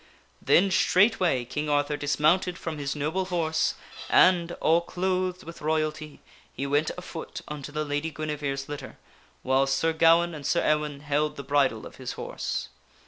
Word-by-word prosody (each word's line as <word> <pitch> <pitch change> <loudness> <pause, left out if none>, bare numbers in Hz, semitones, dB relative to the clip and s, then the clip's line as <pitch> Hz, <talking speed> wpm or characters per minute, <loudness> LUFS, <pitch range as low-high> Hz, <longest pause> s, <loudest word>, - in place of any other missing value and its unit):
Then 195 +2 +4
straightway 185 - +3
King 150 +5 -3
Arthur 145 0 +1
dismounted 155 +5 +1
from 160 -3 -5
his 140 0 -3
noble 155 +6 -1
horse 165 -3 0 0.3
and, 175 -2 +4
all 165 0 +2
clothed 185 +1 -2
with 170 +1 -10
royalty, 155 -1 -2 0.3
he 135 - -4
went 145 +2 +1
afoot 180 -2 -7
unto 145 -1 -7
the 155 +1 -2
Lady 145 +2 -2
Guinevere's 145 -3 -4
litter, 145 -1 -7 0.5
whiles 135 +1 +2
Sir 160 +4 +1
Gawaine 165 +1 +4
and 150 -2 -8
Sir 145 - +1
Ewaine 150 -2 0
held 150 +1 0
the 140 - -7
bridle 135 -5 +1
of - - -11
his - - -5
K.. - - -13
horse. - - -4
155 Hz, 160 wpm, -27 LUFS, 145-170 Hz, 0.5 s, Then